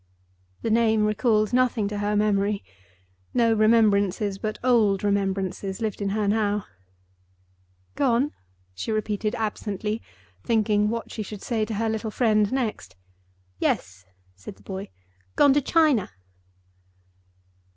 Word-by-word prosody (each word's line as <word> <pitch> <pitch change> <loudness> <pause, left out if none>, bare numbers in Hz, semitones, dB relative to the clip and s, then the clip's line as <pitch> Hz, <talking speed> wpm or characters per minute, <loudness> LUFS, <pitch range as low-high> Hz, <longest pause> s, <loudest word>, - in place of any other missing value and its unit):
The 225 - 0
name 220 -1 +3
recalled 215 0 +1
nothing 245 -4 +2
to 205 0 -4
her 205 +1 0
memory. 205 -1 +1 0.7
No 230 -2 +4
remembrances 210 -2 +2
but 215 -1 -3
old 220 -6 +3
remembrances 195 -1 -1
lived 220 -3 -3
in 200 - 0
her 210 +1 0
now. 205 -1 +1 1.3
"Gone?" 275 +1 +1 0.4
she 95 - -4
repeated 215 0 -1
absently, 215 -1 -3 0.4
thinking 210 -2 +2
what 230 +1 -4
she 220 - -5
should 210 -1 -7
say 225 -3 -1
to 220 - -4
her 225 +2 0
little 220 0 -2
friend 215 -2 +2
next. 220 - -3 0.6
"Yes," 95 -1 -2 0.3
said 95 0 -10
the 100 - -22
boy. 190 - -6 0.5
"Gone 285 -2 +5
to 290 - +3
China." 295 - +2
215 Hz, 125 wpm, -25 LUFS, 200-225 Hz, 1.3 s, Gone